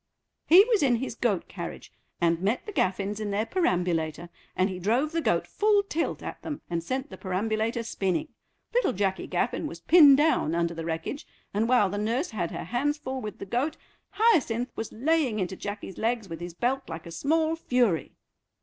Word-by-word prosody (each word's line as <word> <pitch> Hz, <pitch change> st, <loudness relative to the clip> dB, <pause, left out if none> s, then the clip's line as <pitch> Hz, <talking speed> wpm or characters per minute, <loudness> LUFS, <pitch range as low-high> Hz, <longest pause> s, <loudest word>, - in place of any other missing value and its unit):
"He 360 Hz, +5 st, +9 dB
was 455 Hz, -4 st, +2 dB
in 260 Hz, -4 st, +4 dB
his 255 Hz, +2 st, -3 dB
goat 220 Hz, -6 st, -1 dB
carriage, 170 Hz, -3 st, -8 dB, 0.3 s
and 170 Hz, -1 st, +2 dB
met 210 Hz, +6 st, 0 dB
the 420 Hz, -, -6 dB
Gaffins 200 Hz, -, -1 dB
in 215 Hz, -1 st, -3 dB
their 205 Hz, +2 st, 0 dB
perambulator, 175 Hz, -, 0 dB, 0.3 s
and 185 Hz, -, +2 dB
he 185 Hz, -2 st, -5 dB
drove 240 Hz, -, +1 dB
the 330 Hz, 0 st, 0 dB
goat -, -, +1 dB
full 415 Hz, -1 st, +2 dB
tilt 335 Hz, -5 st, -2 dB
at -, -, -6 dB
them 295 Hz, -, -5 dB
and 170 Hz, -1 st, -1 dB
sent 260 Hz, -, -3 dB
the -, -, -9 dB
perambulator 220 Hz, +5 st, -1 dB
spinning. 195 Hz, -6 st, -1 dB, 0.4 s
Little -, -, +2 dB
Jacky 190 Hz, -1 st, -1 dB
Gaffin -, -, -1 dB
was -, -, -8 dB
pinned 295 Hz, -6 st, +8 dB
down 295 Hz, -, +2 dB
under 170 Hz, 0 st, 0 dB
the 165 Hz, -1 st, -6 dB
wreckage, 165 Hz, -, -4 dB, 0.3 s
and 220 Hz, +3 st, +1 dB
while 245 Hz, -5 st, +5 dB
the 205 Hz, -, -2 dB
nurse 235 Hz, +10 st, -1 dB
had 180 Hz, -6 st, -2 dB
her -, -, -5 dB
hands 275 Hz, -, 0 dB
full 265 Hz, -3 st, -5 dB
with 210 Hz, -1 st, -6 dB
the -, -, -7 dB
goat 250 Hz, +10 st, -1 dB, 0.4 s
Hyacinth 305 Hz, -, +2 dB
was 225 Hz, -, -5 dB
laying 275 Hz, -2 st, +1 dB
into 190 Hz, -1 st, -2 dB
Jacky's 205 Hz, -1 st, -6 dB
legs 225 Hz, -2 st, 0 dB
with 165 Hz, -2 st, -7 dB
his 175 Hz, -1 st, -7 dB
belt 260 Hz, +5 st, -1 dB
like 160 Hz, 0 st, -6 dB
a 170 Hz, -, -8 dB
small 315 Hz, -, +1 dB
fury." 245 Hz, -, 0 dB
225 Hz, 195 wpm, -27 LUFS, 185-285 Hz, 0.4 s, He